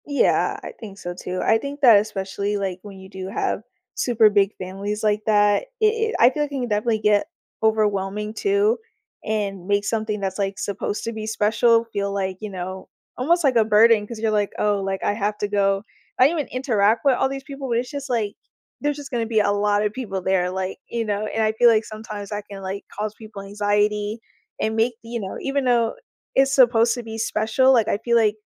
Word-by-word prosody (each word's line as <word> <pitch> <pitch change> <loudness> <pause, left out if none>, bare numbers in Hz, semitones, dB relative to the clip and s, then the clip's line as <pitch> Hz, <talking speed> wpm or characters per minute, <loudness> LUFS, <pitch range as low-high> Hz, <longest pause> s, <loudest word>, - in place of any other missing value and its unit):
Yeah. 285 -1 +2
I - - -6
think 200 -3 -9
so 175 -3 -6
too. 180 +1 -5
I 225 - +4
think 280 +3 -7
that 235 -6 +8
especially, 200 0 -2
like, 190 -2 -3
when 200 -2 -11
you 190 0 -12
do 190 -1 -7
have 195 - -2 0.3
super 225 -3 +4
big 200 -1 +3
families 200 +3 -5
like 210 0 +2
that, 205 - +3
it 435 - +3
it 445 +1 +1
I 240 - +7
feel 295 +3 -1
like 290 - -4
you 275 -2 -3
can 245 - -3
definitely 215 +1 +1
get 210 +6 +2 0.4
overwhelming 210 -1 0
too, 405 - +1 0.4
and 200 -4 -3
make 205 0 +1
something 215 -1 -1
that's, 195 0 -3
like, 195 -1 -1
supposed 205 +1 -3
to 230 - -2
be 220 -1 -6
special 230 +2 +3
feel 200 0 -1
like, 190 -2 -2
you 215 - -5
know, 185 0 -6 0.3
almost 335 +7 +2
like 270 -4 +3
a 225 -2 +4
burden 220 0 +5
'cause 230 -1 -7
you're 220 0 0
like, 210 -1 +1
"Oh, 205 -1 +1
like, 195 0 -3
I - - +1
have 210 0 -2
to 205 - -1
go." 195 -1 +1 0.4
I 255 - +7
don't 330 +2 -1
even 290 - -2
interact 230 -3 +1
with 270 -2 +5
all 265 - +1
these 270 0 -5
people, 275 -1 -7
but 230 - +1
it's 245 +1 -2
just, 280 -1 -6
like, 220 -4 -1 0.5
there's 290 0 0
just 285 -2 -9
gonna 235 -2 -1
to - - -7
be 220 -2 +2
a 205 -1 +2
lot 205 0 +1
of 210 - -1
people 210 -7 -4
there, 185 -1 +1
like, 190 0 -4
you 230 -1 -2
know, 210 0 -1
and 220 - -1
I 215 - +2
feel 240 +2 +5
like 220 -1 +3
sometimes 215 -1 -8
I 205 0 -3
can, 200 -1 -8
like, 195 +1 -5
cause 210 0 -2
people 210 -3 -10
anxiety, 205 +1 0 0.4
and 220 0 -1
make 230 +2 +2
the 230 - -12
you 235 0 -3
know, 190 -3 -5
even 275 0 -1
though 235 -2 +2 0.4
it's 270 0 +4
supposed 235 -3 +5
to 245 - -6
be 225 -1 -7
special, 225 +4 +2
like, 230 -4 +3
I - - +1
feel 235 -1 +3
like 215 -2 +3
215 Hz, 225 wpm, -22 LUFS, 200-235 Hz, 0.5 s, that